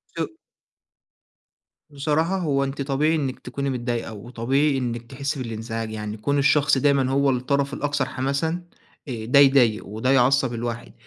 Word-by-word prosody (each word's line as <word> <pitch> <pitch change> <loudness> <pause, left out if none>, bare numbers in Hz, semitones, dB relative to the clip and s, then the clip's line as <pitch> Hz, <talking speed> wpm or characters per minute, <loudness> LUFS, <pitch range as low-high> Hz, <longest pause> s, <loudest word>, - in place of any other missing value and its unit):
شو - - -1 1.6
بصراحة 155 +6 0
هو 140 -6 0
أنتِ 140 +1 -4
طبيعي 145 +4 +1
إنك 135 -4 -2
تكوني 140 +2 -4
متضايقة، 120 -3 -3
وطبيعي 125 +6 0
إنك 120 -2 -2
تحسي 140 +1 -3
بالانزعاج 115 0 -5
يعني 105 0 -5
كون 140 +6 0
الشخص 140 0 +3
دايمًا 135 -1 +2
هو 140 0 +3
الطرف 135 +2 0
الأكثر 145 -2 -1
حماسًا 140 +7 -2 0.4
آآ 115 -4 -5
ده 130 +4 +5
يضايق 135 -6 +5
وده 110 +6 -1
يعصب 130 -1 +3
الواحد، 120 0 -5
135 Hz, 140 wpm, -23 LUFS, 120-140 Hz, 1.6 s, ده